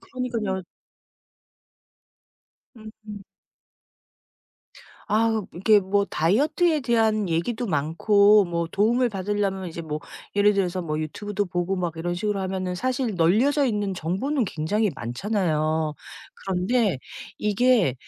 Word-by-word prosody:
그러니깐요. 230 -7 -3 2.1
음. 215 -2 -11 1.9
아 220 0 +2
이렇게 205 +4 +4
뭐 200 +1 +1
다이어트에 290 - +1
대한 220 -5 +1
얘기도 220 +9 -1
많고 200 +6 +4
뭐 170 -1 -2
도움을 240 +5 +2
받으려면 195 -2 -2
이제 170 +1 -7
뭐 155 -1 -4 0.4
예를 205 +1 +5
들어서 185 -2 -1
뭐 155 -2 -3
YouTube도 205 +6 -3
보고 175 +2 -2
막 175 -3 -2
이런 175 +2 -2
식으로 205 +2 -2
하면은 185 -1 -3
사실 255 0 -1
널려져 235 - +3
있는 205 -4 -1
정보는 195 - -1
굉장히 200 +4 -1
많잖아요. 155 - -1 0.5
그런데 195 - +1 0.4
이게 210 - +2
200 Hz, 270 characters per minute, -24 LUFS, 175-220 Hz, 2.1 s, 예를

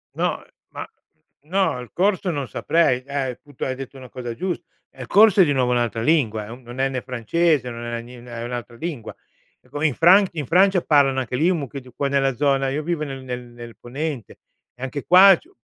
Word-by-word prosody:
No, - - -1
ehm - - -25 0.2
ma - - -7 0.6
no, 185 -4 0
il 125 - -10
corso 190 0 +1
non 140 -4 -3
saprei, 130 +1 +1
eh 140 -1 -3
appunto, 140 +2 -8
hai 130 - -2
detto 135 +1 -9
una 130 -1 -11
cosa 120 -2 -6
giusta. 175 +7 -4 0.3
Eh, 130 - -14
il 125 - -7
corso 205 - +6
è - - +7
di 145 - +1
nuovo 125 -2 +1
un'altra 120 -2 0
lingua. 115 -7 +1
È 105 - -12
un 125 +3 -10
non 120 +2 -10
è 135 0 +2
né 130 -1 -3
francese, 130 +3 0
non 120 0 -7
è 120 0 -4
né 120 +1 -12
ni 120 - -14
è 115 -1 -6
un'altra 120 0 -6
lingua. 145 -3 -6 0.4
È - - -28
come 150 +2 0
in 145 - -1
Fran 185 +5 +6
in 155 -4 -4
Francia 185 +4 +4
parlano 140 -4 +3
anche 125 -1 -3
lì 165 +7 +2
un 180 - +1
mucchio 140 -1 -6
di 125 0 -16
qua 140 - -1
nella 135 -2 +1
zona 135 -1 +1
io 145 +3 -2
vivo 165 -1 -2
nel 135 -3 -6
nel 125 -1 -5
nel 120 -1 -12
ponente, 135 +1 -6 0.4
e 125 - -10
anche 135 +2 -5
qua 190 +2 +8
c'è - - -22
135 Hz, 235 wpm, -22 LUFS, 125-160 Hz, 0.6 s, qua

